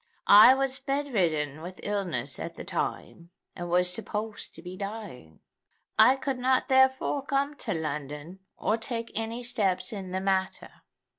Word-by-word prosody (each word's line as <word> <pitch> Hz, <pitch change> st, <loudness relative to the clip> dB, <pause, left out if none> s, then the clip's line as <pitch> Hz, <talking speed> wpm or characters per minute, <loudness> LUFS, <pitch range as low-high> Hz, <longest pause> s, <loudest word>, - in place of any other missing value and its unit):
I 215 Hz, +6 st, +9 dB
was 270 Hz, 0 st, -1 dB
bed 280 Hz, 0 st, -2 dB
ridden 155 Hz, -6 st, 0 dB
with 180 Hz, +3 st, -9 dB
illness 200 Hz, -4 st, -2 dB
at -, -, -6 dB
the -, -, -7 dB
time, 170 Hz, 0 st, -4 dB, 0.3 s
and 175 Hz, -1 st, -6 dB
was 180 Hz, +1 st, +3 dB
supposed 215 Hz, +1 st, -5 dB
to 165 Hz, -, -10 dB
be 180 Hz, +1 st, -7 dB
dying. 195 Hz, -, -8 dB, 0.6 s
I 260 Hz, -, +8 dB
could 270 Hz, -1 st, -3 dB
not 255 Hz, +1 st, +2 dB
therefore 265 Hz, +1 st, +3 dB
come 280 Hz, +1 st, 0 dB
to -, -, -3 dB
London, 150 Hz, +2 st, -5 dB, 0.2 s
or 215 Hz, -, 0 dB
take 230 Hz, 0 st, -4 dB
any 225 Hz, +2 st, -3 dB
steps 200 Hz, -6 st, 0 dB
in 195 Hz, -3 st, -6 dB
the 185 Hz, +1 st, -2 dB
matter. 190 Hz, 0 st, -1 dB
205 Hz, 155 wpm, -28 LUFS, 180-255 Hz, 0.6 s, I